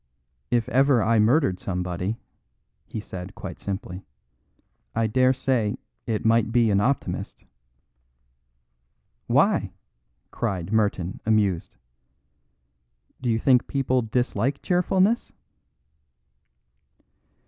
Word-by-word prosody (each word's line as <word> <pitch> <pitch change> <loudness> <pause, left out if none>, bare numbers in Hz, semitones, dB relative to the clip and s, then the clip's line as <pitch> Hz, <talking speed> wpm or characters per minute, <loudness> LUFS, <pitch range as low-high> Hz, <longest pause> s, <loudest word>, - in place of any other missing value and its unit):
If 120 -2 +1
ever 135 -1 +4
I 115 0 +3
murdered 110 - +3
somebody," 90 +2 -3 0.7
he 110 - -6
added 90 +1 -6
quite - - -8
simply, 95 -1 -5 0.9
"I 115 0 +2
dare 130 +4 +3
say 125 -5 0 0.3
it 110 -1 -2
might 115 0 +3
be 115 -2 +3
an 100 0 +3
Optimist." 135 +6 -2 1.8
"Why?" - - +2 0.6
cried 95 +1 -3
Merton 100 -4 0
amused. 105 -5 +1 1.5
"Do 125 - -1
you 110 - +2
think 125 +1 +3
people 130 -2 +1
dislike 125 +3 -1
cheerfulness?" 185 +5 +1
110 Hz, 95 wpm, -25 LUFS, 100-130 Hz, 1.8 s, ever